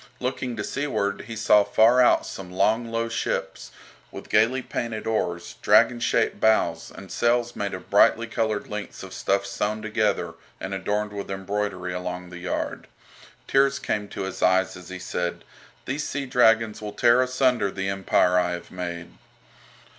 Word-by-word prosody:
Looking 125 -1 -3
to 105 - -4
seaward 100 -9 -2
he 115 - -6
saw 105 -1 +5
far 110 +5 +4
out 125 - +4
some 95 -2 -8
long 110 +5 +1
low 115 0 -1
ships, 115 - -3 0.4
with - - -10
gaily 115 +5 +3
painted 115 -3 -4
oars, 90 -6 -2
dragon 120 - +5
shaped 115 -2 +1
bows, 110 0 +2
and 95 0 -11
sails 120 0 +1
made 100 -1 -3
of - - -12
brightly 115 - +5
coloured 110 -2 -2
lengths 105 0 -6
of - - -9
stuff 100 0 0
sewn 105 +2 -2
together 110 -2 0 0.3
and 95 - -5
adorned 105 +2 -2
with 100 -1 -6
embroidery 95 -1 -3
along 90 0 -5
the 90 - -8
yard. 90 0 -4 0.6
Tears 135 0 +3
came 105 -1 -2
to - - -5
his 95 - -6
eyes 95 +1 +3
as 90 0 -11
he 95 - -6
said: 90 -1 -3 0.4
"These 140 +3 -3
sea 145 -1 -3
dragons 115 -4 +3
will 105 -1 -6
tear 120 +3 +4
asunder 130 -4 +2
the 95 0 -4
empire 95 -2 +2
I 90 0 0
have 85 0 -8
made." 85 -3 -6
105 Hz, 165 wpm, -25 LUFS, 95-115 Hz, 0.6 s, saw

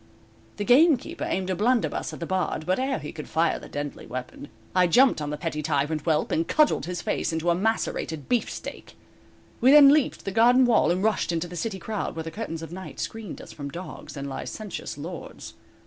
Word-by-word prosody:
The 205 - -2
gamekeeper 305 +7 +4
aimed 190 0 -1
a - - 0
blunderbuss 235 +5 +1
at - - -9
the 170 - -3
Bard, 185 -3 -1
but 185 +5 +1
ere 265 0 0
he 150 - -7
could 150 - -8
fire 165 +2 +1
the - - -11
deadly 145 0 -5
weapon, 130 +3 -7 0.3
I 180 -1 +5
jumped 250 - +4
on 150 - -3
the 150 - -3
petty 160 -2 -3
tyrant 150 0 0
whelp, 155 0 0
and 165 +1 +1
cudgeled 300 - +2
his 175 -1 -4
face - - -1
into 160 +2 0
a - - +4
macerated 175 -6 -1
beefsteak. 245 -2 -3 0.6
We 255 - +5
then 290 -1 +9
leaped 300 -3 +1
the 195 - -2
garden 245 +5 +5
wall 235 -3 +4
and 180 +3 +1
rushed 215 -5 +1
into 170 +1 -2
the 175 - -9
city 195 +4 -3
crowd 210 -2 -4
where 160 - -4
the 165 - -6
curtains 165 -5 -5
of 165 +1 -8
night 185 +1 -8
screened 220 -4 -5
us - - -11
from 140 -1 -6
dogs 170 -1 -8
and 140 0 -4
licentious 190 +6 -6
lords. 165 +4 -8
180 Hz, 210 wpm, -26 LUFS, 160-225 Hz, 0.6 s, then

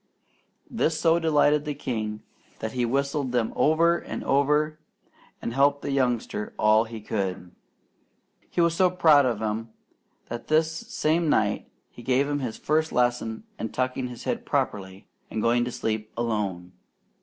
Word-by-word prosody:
This 165 -9 0
so 165 0 +4
delighted 150 -2 +3
the 150 -1 -4
king 110 -6 -4 0.3
that 110 - -4
he 125 0 0
whistled 140 +1 -1
them 120 -2 0
over 170 +2 +3
and - - -6
over 150 +2 +2 0.6
and 115 - -3
helped 140 +2 +3
the 140 - -2
youngster 125 -5 -1
all 110 +1 +4
he 115 -1 -8
could. 95 -4 -3 1.0
He 175 - 0
was 170 -1 +3
so 180 +2 +4
proud 155 -6 +5
of 110 -3 -2
him 110 +1 -2 0.6
that 120 0 -6
this 160 +1 +3
same 160 0 0
night 105 -6 +1 0.2
he - - -12
gave 130 +3 +2
him 145 0 -1
his 125 -5 -4
first 155 +1 0
lesson 120 -2 0 0.2
in 115 - -3
tucking 130 +1 -2
his 120 -2 -9
head - - -2
properly 95 -1 -2 0.2
and 110 - -3
going 120 +2 +2
to 125 - -4
sleep 110 -2 -3
alone. 100 -7 -2
125 Hz, 155 wpm, -26 LUFS, 110-150 Hz, 1.0 s, proud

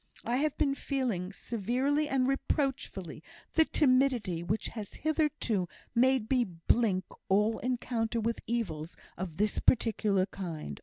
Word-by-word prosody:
I 240 +2 +1
have 300 +1 0
been 275 -2 +2
feeling, 250 -10 -2
severely 255 +9 0
and 260 -2 +2
reproachfully, 270 - -1 0.3
the 320 - +5
timidity 255 - +2
which 205 +6 -1
has 215 -4 -7
hitherto 300 - 0 0.2
made 255 -1 +3
me 255 -2 +4
blink 185 +1 +1 0.2
all 210 +3 +3
encounter 240 -2 -1
with 230 +1 -1
evils 180 -9 -3 0.2
of 175 -4 -5
this 210 +1 +1
particular 210 -5 +3
kind. 165 - -6
230 Hz, 125 wpm, -31 LUFS, 190-265 Hz, 0.3 s, the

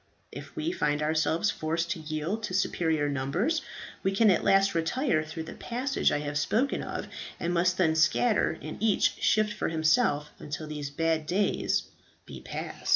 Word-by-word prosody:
If - - -10
we 320 +1 -1
find 150 - 0
ourselves 160 +5 +1
forced 165 +2 -2
to 175 - -2
yield 155 +7 -3
to 185 - -4
superior 160 -5 +1
numbers, 155 - 0 0.4
we 195 - +1
can 205 +1 +5
at 180 - +2
last 195 0 +4
retire 165 - +1
through 160 +1 -6
the - - -8
passage 255 +3 -1
I 145 - 0
have 145 0 -2
spoken 245 - +1
of, - - -5 0.3
and 175 +1 -1
must 175 +1 +2
then 160 -4 +3
scatter 190 +7 +2
and - - -7
each 220 -2 +2
shift 215 -1 +3
for - - -2
himself 155 -2 +2
until 150 +2 -5
these 150 -2 -5
bad 160 +1 0
days 200 +3 +1 0.4
be - - -9
past." - - -6
165 Hz, 170 wpm, -28 LUFS, 155-205 Hz, 0.4 s, can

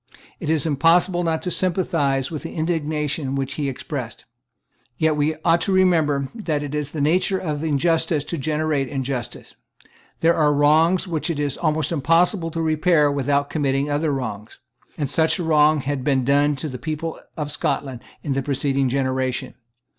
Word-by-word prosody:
It - - -4
is 160 -2 +2
impossible 170 +4 +3
not 165 -1 -1
to 180 - -2
sympathize 165 -8 0
with 155 - -4
the - - -7
indignation 150 -3 -1
which 135 0 -2
he 145 -2 -2
expressed. 130 - -6 0.7
Yet 160 -1 +2
we 150 +1 +1
ought 170 0 +4
to 195 - 0
remember 160 -7 +2
that 160 -10 -2
it 145 0 -6
is 150 -1 -2
the 155 - -6
nature 180 +6 +2
of 155 -5 -3
injustice 160 0 +1
to 170 - -4
generate 150 -1 0
injustice. 130 -3 -4 0.7
There 165 +1 +4
are 150 -3 +3
wrongs 160 +6 +3
which 165 -1 -2
it 160 -3 -2
is 145 -2 -1
almost 155 -1 0
impossible 165 +3 +2
to 165 0 -3
repair 155 -1 +3
without 140 0 0
committing 140 -1 0
other 150 +1 0
wrongs; 110 -6 -5 0.4
and 145 - -1
such 160 +6 +2
a 180 - -3
wrong 155 -1 +4
had 135 0 -3
been 130 -2 +1
done 145 +2 +3
to 135 +3 -4
the 130 -3 -7
people 155 +4 -4 0.2
of 150 -2 -3
Scotland 130 -5 -2 0.2
in 140 - -1
the 135 - 0
preceding 135 -1 0
generation. 130 -1 -1
150 Hz, 170 wpm, -22 LUFS, 140-165 Hz, 0.7 s, ought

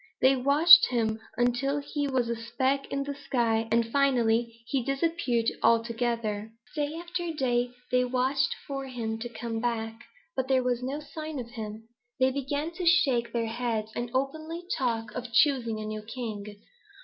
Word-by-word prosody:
They 265 +1 +5
watched 290 +6 +8
him 225 -3 0 0.2
until 245 +4 +1
he 290 0 -2
was 260 -3 0
a 235 - -1
speck 260 +4 -1
in 275 0 -1
the 285 0 -4
sky, 230 -5 0
and 230 0 +3
finally 235 -3 +1
he 260 +3 0
disappeared 275 -4 0
altogether. 230 -2 +1 0.2
"Day 295 0 -1
after 345 0 -3
day 245 -5 0 0.2
they 250 0 +4
watched 260 +2 +1
for 275 -1 -4
him 225 -3 -4
to 240 +1 -5
come 225 0 -4
back, 225 -1 -3 0.3
but 260 - -1
there 260 -1 +3
was 245 -1 0
no 275 +4 -3
sign 310 0 -6
of 240 -2 -6
him; 220 -2 -7 0.3
they 260 0 +4
began 285 +4 -2
to 360 +2 -6
shake 275 -10 +3
their 235 -1 0
heads 225 -2 -2
and 240 0 -3
openly 315 +6 -2
talk 225 -4 -1
of 245 -1 -6
choosing 240 -4 +3
a 215 - -5
new 215 0 -4
king. 215 -2 -6
245 Hz, 165 wpm, -28 LUFS, 230-275 Hz, 0.3 s, watched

